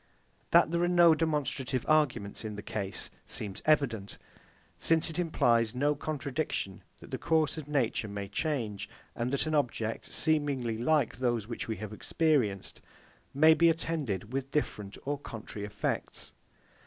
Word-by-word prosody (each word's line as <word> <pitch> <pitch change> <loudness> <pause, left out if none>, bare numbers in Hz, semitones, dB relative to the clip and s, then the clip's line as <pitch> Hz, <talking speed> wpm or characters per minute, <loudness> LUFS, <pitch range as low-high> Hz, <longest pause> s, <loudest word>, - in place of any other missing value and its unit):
That - - +5
there 170 0 +1
are 175 - +3
no 175 -2 +6
demonstrative 140 -5 -1
arguments 130 -11 +1
in 110 -1 -5
the 105 - -7
case 100 -2 -3 0.2
seems 100 -3 -4
evident; 120 -10 +1 0.6
since 165 0 +3
it 160 - -4
implies 120 -9 +2
no 145 +3 +2
contradiction 145 - -3 0.2
that - - -13
the - - -3
course 160 -3 +2
of 155 -3 -7
nature 130 -6 0
may 100 -1 -5
change, 105 -5 -2 0.3
and 120 +1 -2
that 140 +2 +2
an 155 - -2
object, 120 -6 -1
seemingly 140 -8 0
like 145 0 +2
those 120 -4 0
which 115 - -5
we 110 - -2
have 110 +1 -7
experienced, 120 - 0 0.5
may 155 +3 +6
be 170 +1 +5
attended 145 - -1
with 135 0 -2
different 105 -9 -2
or 145 0 -2
contrary 110 -5 -7
effects. 105 - -3
135 Hz, 150 wpm, -30 LUFS, 110-155 Hz, 0.6 s, no